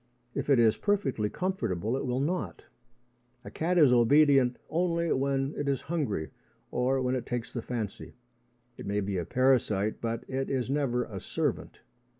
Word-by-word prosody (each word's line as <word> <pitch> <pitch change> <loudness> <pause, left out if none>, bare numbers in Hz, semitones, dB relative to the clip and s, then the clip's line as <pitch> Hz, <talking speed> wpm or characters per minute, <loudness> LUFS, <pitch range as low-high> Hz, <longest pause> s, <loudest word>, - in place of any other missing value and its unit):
If - - -3
it 140 - +6
is 115 -2 +4
perfectly 140 - 0
comfortable, 120 - -2
it 135 - -3
will 125 +1 0
not. 175 +5 -2 0.8
A - - -8
cat 175 +3 0
is 145 -7 +6
obedient 135 +1 +5
only 170 0 0
when 135 +1 0
it 145 -1 -2
is 135 - 0
hungry 140 - -2 0.4
or 130 +2 +1
when 125 0 0
it 125 -2 -3
takes 120 0 -4
the 120 - -3
fancy. 110 -4 -5 0.6
It - - -8
may 100 +1 0
be 100 -1 -2
a 85 - -3
parasite, 115 -5 +1
but 115 0 -2
it 135 0 -2
is 130 -1 -1
never 135 -4 +1
a 100 -5 -7
servant. - - -3
130 Hz, 165 wpm, -29 LUFS, 115-145 Hz, 0.8 s, it